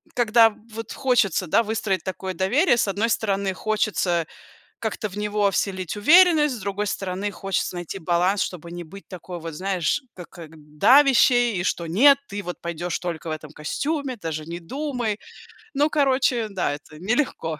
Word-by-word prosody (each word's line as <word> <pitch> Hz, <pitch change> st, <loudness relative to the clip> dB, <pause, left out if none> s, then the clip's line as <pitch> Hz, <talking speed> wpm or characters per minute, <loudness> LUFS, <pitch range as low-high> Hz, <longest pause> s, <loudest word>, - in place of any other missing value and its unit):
когда 230 Hz, -1 st, +5 dB, 0.2 s
вот 225 Hz, 0 st, -7 dB
хочется, 235 Hz, -, +1 dB
да, 230 Hz, +8 st, +3 dB
выстроить 210 Hz, -5 st, -2 dB
такое 190 Hz, 0 st, -4 dB
доверие, 240 Hz, -, +2 dB
с 220 Hz, -, +1 dB
одной 210 Hz, +4 st, 0 dB
стороны 200 Hz, -4 st, 0 dB
хочется 195 Hz, -5 st, 0 dB, 0.5 s
как-то 215 Hz, -1 st, -3 dB
в 195 Hz, -, -10 dB
него 210 Hz, -1 st, +1 dB
вселить 185 Hz, -1 st, -2 dB
уверенность, 305 Hz, -, +5 dB
с -, -, -8 dB
другой 200 Hz, +2 st, -3 dB
стороны 195 Hz, +1 st, -3 dB
хочется 195 Hz, -2 st, -3 dB
найти 175 Hz, +2 st, -6 dB
баланс, 180 Hz, +4 st, +1 dB
чтобы 170 Hz, -2 st, -4 dB
не 175 Hz, 0 st, -6 dB
быть 195 Hz, +5 st, -13 dB
такой 180 Hz, -1 st, -8 dB
вот, 165 Hz, -1 st, -7 dB
знаешь, 190 Hz, -, -1 dB
ка 180 Hz, -, -9 dB
как 165 Hz, -4 st, -12 dB, 0.3 s
давящей, 245 Hz, -5 st, +5 dB
и -, -, -2 dB
что: 170 Hz, -1 st, -2 dB
"Нет, 275 Hz, -, +6 dB
ты 205 Hz, 0 st, -6 dB
вот 180 Hz, -, -7 dB
пойдешь 170 Hz, 0 st, -3 dB
только 170 Hz, -2 st, -5 dB
в -, -, -3 dB
этом 155 Hz, -1 st, -7 dB
костюме, 275 Hz, -, -3 dB
даже 155 Hz, -4 st, -5 dB
не 170 Hz, +1 st, -6 dB
думай". 245 Hz, -, -3 dB, 0.5 s
Ну, 290 Hz, +2 st, +2 dB
короче, 260 Hz, -5 st, +2 dB
да, 185 Hz, -7 st, -1 dB
это 150 Hz, +1 st, -14 dB
нелегко 190 Hz, -, -1 dB
200 Hz, 165 wpm, -23 LUFS, 175-235 Hz, 0.5 s, Нет